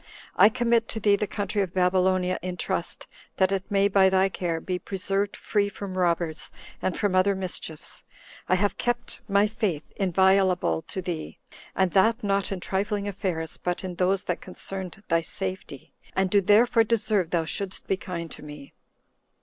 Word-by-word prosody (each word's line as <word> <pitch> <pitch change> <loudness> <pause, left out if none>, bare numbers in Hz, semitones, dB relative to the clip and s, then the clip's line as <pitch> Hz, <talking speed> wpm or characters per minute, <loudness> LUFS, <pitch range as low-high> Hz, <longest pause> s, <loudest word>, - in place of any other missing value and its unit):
I 205 - +7
commit 235 -1 +1
to 220 - -5
thee 205 -1 +4
the 205 +1 -2
country 205 0 -2
of 185 -2 -3
Babylonia 185 0 +2
in 180 0 -4
trust, - - -2 0.3
that 190 0 +2
it 195 +1 -2
may, 200 -1 +3
by 195 -1 +5
thy 190 0 +3
care, 170 -3 -2
be 180 +2 -3
preserved 195 +1 -2
free 205 -2 0
from 200 -1 -7
robbers, 170 -3 0 0.3
and 185 - -1
from 205 -3 0
other 185 +2 +3
mischiefs. 180 -4 -4 0.5
I 185 - +5
have 200 +2 0
kept 240 0 -2
my 200 0 +4
faith 210 -8 -1
inviolable 190 - +3
to 190 - -4
thee, 170 -3 -5 0.4
and 190 -2 +2
that 220 +6 +3
not 200 -1 0
in 195 - -2
trifling 200 +2 -1
affairs, 175 -5 -3
but 180 +1 -2
in 185 -1 -4
those 185 +2 +1
that 180 -3 -3
concerned 190 +1 -6
thy 165 -1 +2
safety, 185 -5 -5 0.2
and 190 -1 +1
do 205 - +5
therefore 225 +4 +5
deserve 215 -5 +1
thou 170 -2 0
shouldst 195 +4 -3
be 195 - +1
kind 170 -4 -6
to - - -10
me." 150 -2 -10
190 Hz, 175 wpm, -26 LUFS, 180-200 Hz, 0.5 s, I